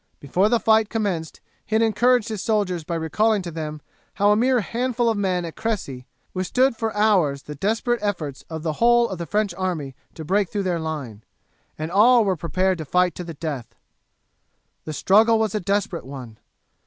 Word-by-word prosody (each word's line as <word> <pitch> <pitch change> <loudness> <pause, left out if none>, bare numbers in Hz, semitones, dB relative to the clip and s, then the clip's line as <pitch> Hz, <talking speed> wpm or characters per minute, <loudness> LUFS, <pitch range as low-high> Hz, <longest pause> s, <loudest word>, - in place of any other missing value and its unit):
Before 180 +9 +1
the 235 0 +3
fight 220 -1 +3
commenced 190 -8 -3 0.2
he 215 - -3
had 225 - +4
encouraged 235 +2 +2
his 215 -3 -4
soldiers 200 -6 0
by 170 +2 -4
recalling 200 +6 +1
to 175 - -6
them 155 -2 -5 0.3
how 205 +1 +3
a - - +5
mere 250 +2 +3
handful 240 +1 -1
of - - -2
men 185 -3 0
had 170 - -4
at - - -14
Cressy 140 - -4 0.3
withstood 235 +8 +1
for 225 -1 -2
hours 180 -10 +2
the 150 - -7
desperate 225 - 0
efforts 165 -10 -3
of 160 -1 -6
the 160 -2 -1
whole 240 0 +5
of 190 - -6
the 170 - -5
French 210 -3 0
army 175 -7 -3 0.2
to 160 - -7
break 195 +2 +1
through 205 -2 -2
their 180 -3 -1
line, 140 -10 -5 0.5
and 155 +2 -4
all 230 +4 +5
were 190 -2 +1
prepared 185 +2 0
to - - -3
fight 180 +3 +2
to 180 - -6
the 165 -2 -8
death. 145 -7 -5 1.1
The 155 - -5
struggle 220 +8 +4
was 220 -2 0
a 210 - 0
desperate 195 -5 -2
one. 125 -5 -9
190 Hz, 195 wpm, -23 LUFS, 160-220 Hz, 1.1 s, a